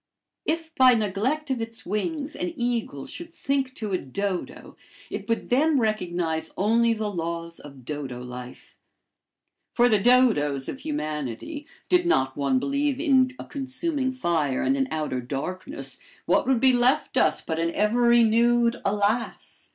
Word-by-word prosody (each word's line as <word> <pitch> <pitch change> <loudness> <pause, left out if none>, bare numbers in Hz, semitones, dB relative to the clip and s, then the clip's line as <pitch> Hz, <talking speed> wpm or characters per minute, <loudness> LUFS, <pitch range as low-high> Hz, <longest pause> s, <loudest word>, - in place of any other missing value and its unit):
If 320 0 -2
by 255 -3 +6
neglect 230 +8 -1
of 250 -3 -1
its 225 0 -7
wings, 280 - -3
an 180 - -3
eagle 235 - -2
should 340 0 -9
sink 270 -2 -1
to 215 -3 -4
a 185 - +1
dodo, 190 +7 -4 0.4
it - - -5
would 230 - -1
then 290 +4 +3
recognize 175 -8 -1
only 230 +4 +3
the 215 -1 -3
laws 170 -1 -4
of 140 -4 -13
dodo 135 -4 -5
life. 125 0 -10 0.9
For 240 0 +4
the 215 -4 +3
dodos 195 - +3
of 265 - -5
humanity, 270 - -4 0.2
did 355 -1 +3
not 130 - +2
one 140 -2 +1
believe 280 - 0
in 265 -4 +4
a - - -8
consuming 275 0 -2
fire 165 - 0
and 275 - +2
an 270 -1 0
outer 150 -5 -2
darkness, 185 - -6 0.3
what - - +2
would 265 -3 +3
be 260 +1 +5
left 245 +2 +2
us - - +3
but 160 -1 -3
an 165 0 0
ever 215 +4 +2
renewed 235 +1 +4
alas! 205 +3 -1
225 Hz, 150 wpm, -25 LUFS, 165-265 Hz, 0.9 s, by